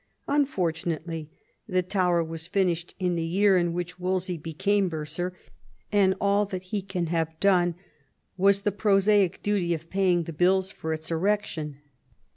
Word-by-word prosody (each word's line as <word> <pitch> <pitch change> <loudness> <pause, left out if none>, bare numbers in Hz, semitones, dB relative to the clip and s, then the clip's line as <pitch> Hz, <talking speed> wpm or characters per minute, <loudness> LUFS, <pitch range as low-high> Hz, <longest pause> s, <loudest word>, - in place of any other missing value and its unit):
Unfortunately 165 - -1 0.4
the 185 -3 +1
tower 180 -2 +1
was 165 0 -7
finished 180 -3 0
in 180 -2 0
the 170 - -1
year 195 +4 +3
in 175 -1 +2
which 175 +1 -4
Wolsey 185 0 -1
became 190 +5 0
bursar, 160 +3 -3 0.6
and 195 -2 +4
all 200 +1 +3
that 185 -2 -5
he 200 +2 -3
can 185 -2 -3
have 160 -1 -2
done 180 -3 +3 0.6
was 195 +1 +3
the 205 0 +1
prosaic 200 -1 +2
duty 190 -5 +1
of 165 +1 -11
paying 185 -3 +2
the 165 - -7
bills 185 +4 +2
for 160 - -5
its 160 +1 -4
erection. 165 -5 -1
180 Hz, 150 wpm, -26 LUFS, 165-195 Hz, 0.6 s, and